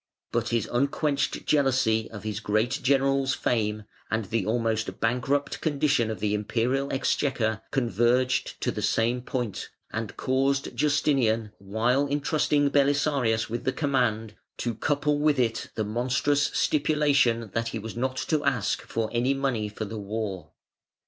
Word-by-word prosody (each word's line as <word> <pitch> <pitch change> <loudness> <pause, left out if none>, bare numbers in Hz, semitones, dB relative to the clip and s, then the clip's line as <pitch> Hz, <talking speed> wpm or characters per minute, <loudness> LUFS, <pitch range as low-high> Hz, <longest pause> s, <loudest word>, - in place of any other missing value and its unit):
But 120 0 0
his 115 -3 0
unquenched 140 +3 0
jealousy 130 -6 +2
of 105 -2 -9
his 110 -1 -3
great 110 +4 0
general's 135 0 +2
fame, 105 -2 -1 0.3
and 110 -1 -1
the 105 0 -1
almost 115 -1 -1
bankrupt 125 +5 0
condition 145 -6 +1
of 110 -4 -4
the 105 +1 0
Imperial 120 +6 0
exchequer 125 -5 0
converged 125 +1 +1
to - - 0
the - - -4
same 120 +2 +1
point, 120 -4 -4 0.2
and 110 -2 -4
caused 135 +1 0
Justinian, 120 -7 +1
while 115 +8 +1
entrusting 145 0 +1
Belisarius 140 -5 +2
with 120 +2 -4
the 130 - 0
command, 125 -7 0 0.2
to 120 - -2
couple 145 +5 0
with 150 -1 +3
it 115 -3 0
the 110 - 0
monstrous 125 +6 +1
stipulation 140 -7 +2
that 115 0 -1
he 115 - -3
was 110 +1 -7
not 130 +2 -2
to 155 +1 0
ask 125 -8 0
for 115 -1 -2
any 125 +3 +2
money 130 -6 -1
for 110 +1 -5
the 110 +1 -6
war. 100 -2 -4
120 Hz, 145 wpm, -26 LUFS, 110-140 Hz, 0.3 s, with